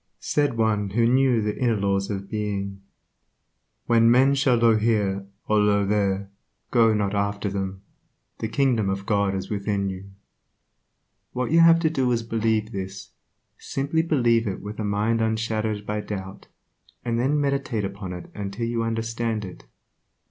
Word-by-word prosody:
Said 145 -5 0
one 105 -3 +1
who 115 +4 +2
knew 125 -2 +3
the 105 0 -1
inner 120 -3 +2
laws 100 -1 0
of 100 -1 -4
Being," 100 -2 -3 1.0
When 115 -1 +4
men 130 +3 +5
shall 135 -3 +2
say 120 - +3
Io 115 -1 +6
here, 105 -3 0 0.2
or 105 -1 +3
Io 100 -1 +3
there, 100 -1 0 0.4
go 115 -2 +5
not 100 -1 0
after 100 0 -1
them; 95 -1 -4 0.6
the 110 - -2
kingdom 115 -4 +1
of 95 0 -3
God 100 -2 +1
is 95 - -5
within 100 -1 -1
you." 95 +1 -8 1.2
What 125 +1 -2
you 165 - +5
have 165 0 +7
to 160 - +3
do 130 -5 +1
is 115 -1 0
to 115 - -17
believe 110 -1 0
this, 95 -1 -6 0.5
simply 140 +4 -1
believe 120 -8 +2
it 95 - -3
with 105 +1 -8
a - - -1
mind 105 +3 0
unshadowed 110 -1 -1
by 105 0 -2
doubt, 95 -2 -7 0.6
and 115 -1 0
then 140 +5 +1
meditate 135 -7 -1
upon 100 -1 -6
it 90 -1 -8 0.2
till 115 +4 -3
you 115 0 -1
understand 115 -1 -2
it. 90 - -11
110 Hz, 165 wpm, -24 LUFS, 100-115 Hz, 1.2 s, have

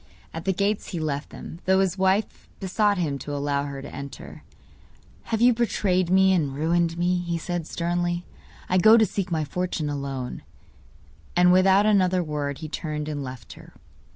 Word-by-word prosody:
At 165 +1 -6
the 195 - +2
gates 200 +3 -1
he 175 - -4
left 145 -2 -3
them, 165 - -9
though 190 0 +4
his 190 -2 +1
wife 190 +2 0
besought 205 +2 +1
him 150 -6 -1
to 145 +1 -5
allow 140 0 -1
her 140 -1 -6
to 145 - -9
enter. 140 0 -9 0.9
'You 230 +2 +4
have 245 - +2
betrayed 185 -6 +1
me 190 +1 +5
and 145 -7 0
ruined 165 +2 +1
me,' 175 +1 +1
he 170 -1 -2
said 170 -1 -4
sternly; 175 0 -2 0.4
'I 185 - +2
go 220 +5 +7
to 220 - +5
seek 195 -1 -3
my 160 -2 0
fortune 165 -1 -2
alone.' 135 -3 -4 0.9
And 180 0 +5
without 190 +2 +5
another 185 -4 +3
word 145 -3 -3
he - - -4
turned 150 -1 -4
and 145 -2 -3
left 130 -4 -8
her. - - -15
175 Hz, 180 wpm, -25 LUFS, 150-190 Hz, 0.9 s, go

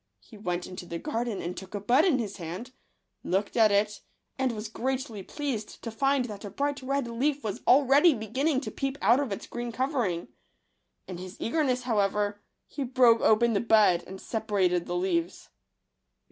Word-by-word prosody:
He 95 - -17
went 180 -4 -3
into 180 -1 -8
the 170 - -4
garden 235 - -3
and 175 +1 -4
took 190 +2 -8
a - - -2
bud 240 - +3
in 335 -8 +3
his 215 -5 -4
hand, 180 +8 -6 0.5
looked 195 +3 -1
at 220 -3 +5
it, 205 +1 +1 0.3
and 260 -1 0
was 215 -1 -5
greatly 255 -1 -3
pleased 250 -2 -5
to 230 - -4
find 270 +3 +1
that 210 -3 -8
a 205 - -5
bright 285 +7 -2
red 275 -1 -1
leaf 270 +4 -1
was 210 -3 -4
already 280 +4 +6
beginning 260 +6 0
to 220 -6 -5
peep 275 +4 -3
out 235 +6 +4
of 280 -6 -2
its 195 - -4
green 240 0 -5
covering. 240 - -1 0.8
In 180 -2 -7
his 185 +1 -9
eagerness, 255 -1 0
however, 205 -3 0 0.2
he 285 - -5
broke 245 -2 +4
open 230 +2 +4
the 200 - +1
bud 215 -6 +4
and 190 +1 -8
separated 195 -6 0
the 175 - -2
leaves. 175 -1 -1
225 Hz, 180 wpm, -28 LUFS, 195-260 Hz, 0.8 s, already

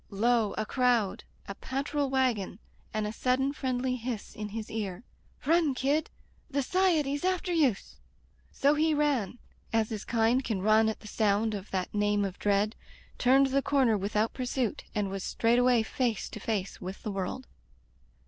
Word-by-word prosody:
Lo! 220 +1 +1
a 215 - -1
crowd, 245 -5 +1 0.2
a 200 - -4
patrol 275 +5 -2
wagon, 255 -8 0 0.3
and 215 0 -1
a 210 - -3
sud 250 +2 +1
den 270 +1 0
friendly 255 -2 -1
hiss 235 -3 -5
in 210 0 -5
his 220 +1 -6
ear: 205 -2 -4 0.4
"Run, 320 -2 +3
kid! 285 +5 +1 0.4
The 280 -1 0
S'iety's 310 -4 +1
after 370 0 0
youse!'' 275 - +1 0.5
So 280 +1 +3
he 310 +1 +2
ran, 275 -8 0 0.3
as 225 -1 +1
his 215 -3 -4
kind 235 +3 +2
can 210 -6 -2
run 215 +1 +5
at 220 - -5
the 215 - -11
sound 215 +1 +1
of 200 -1 -6
that 185 -1 -3
name 205 -1 +1
of 195 -1 -6
dread, 205 +2 +1 0.4
turned 270 +2 +4
the 275 +1 +3
corner 265 -6 +3
without 210 +2 0
pursuit, 250 -2 -2
and 205 -2 -1
was 195 -1 -4
straightway 240 0 +3
face 235 -1 -1
to - - -8
face 200 -2 -3
with 185 +1 -7
the 210 - -3
world. 195 +6 -4
230 Hz, 165 wpm, -29 LUFS, 210-270 Hz, 0.5 s, run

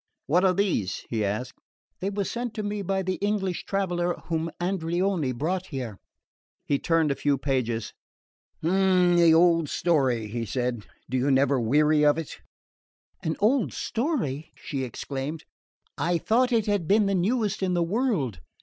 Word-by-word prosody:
"What 175 +6 +3
are 185 -1 +4
these?" 180 - -1
he 110 -3 0
asked. 105 +5 -3 0.4
"They 190 - -1
were 200 0 -2
sent 235 +2 -4
to 215 - -3
me 205 0 -2
by 190 0 -1
the 185 0 -2
English 200 -3 -1
traveller 175 -3 -1
whom 165 0 -1
Andreoni 175 -3 0
brought 175 +9 -2
here." 125 - -5 0.7
He 140 - +1
turned 165 -3 +2
a - - 0
few 145 0 +1
pages. 120 -5 -1 0.7
"The 180 -1 +4
old 165 -2 +4
story," 130 -10 +1
he 115 +2 -4
said. 120 0 -3 0.2
"Do 130 - -1
you 130 +3 +1
never 135 0 +3
weary 150 +6 +3
of 145 0 +4
it?" 165 -3 -6 0.8
"An 160 - -1
old 230 +5 +2
story?" 220 - -2
she 135 -3 -4
exclaimed. 135 +5 -5 0.6
"I 170 +4 +1
thought 245 +9 +2
it 225 -3 +2
had 205 -6 0
been 210 +3 +4
the 195 - +1
newest 205 +2 0
in 185 -2 +1
the 175 - +2
world. 170 - 0
170 Hz, 160 wpm, -26 LUFS, 135-195 Hz, 0.8 s, are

